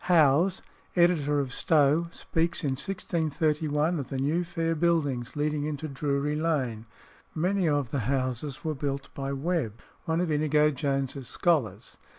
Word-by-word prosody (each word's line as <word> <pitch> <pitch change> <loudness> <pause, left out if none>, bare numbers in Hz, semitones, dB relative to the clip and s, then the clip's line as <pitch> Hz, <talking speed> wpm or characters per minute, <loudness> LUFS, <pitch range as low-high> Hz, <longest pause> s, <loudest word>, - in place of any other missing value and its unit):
Howes 170 +2 +4 0.3
(editor 160 -5 +3
of 135 -3 -2
Stow) 155 +3 +3
speaks 165 +1 -1
in 140 - +1
1631, 155 -1 0
of 135 - -5
"the 135 - -3
new 150 +6 +1
fair 165 -1 -1
buildings 150 -7 0
leading 150 0 0
into 155 0 -3
Drury 140 +1 -1
Lane." 130 -9 -1 0.5
Many 180 +2 +1
of 145 -5 0
the 140 - 0
houses 130 0 -2
were 160 -1 -1
built 140 -1 -4
by 135 0 -4
Webb, 140 - -2 0.3
one 165 0 0
of 175 -2 0
Inigo 150 0 +3
Jones's 135 -2 -2
scholars. 125 - 0
150 Hz, 145 wpm, -28 LUFS, 140-165 Hz, 0.5 s, Howes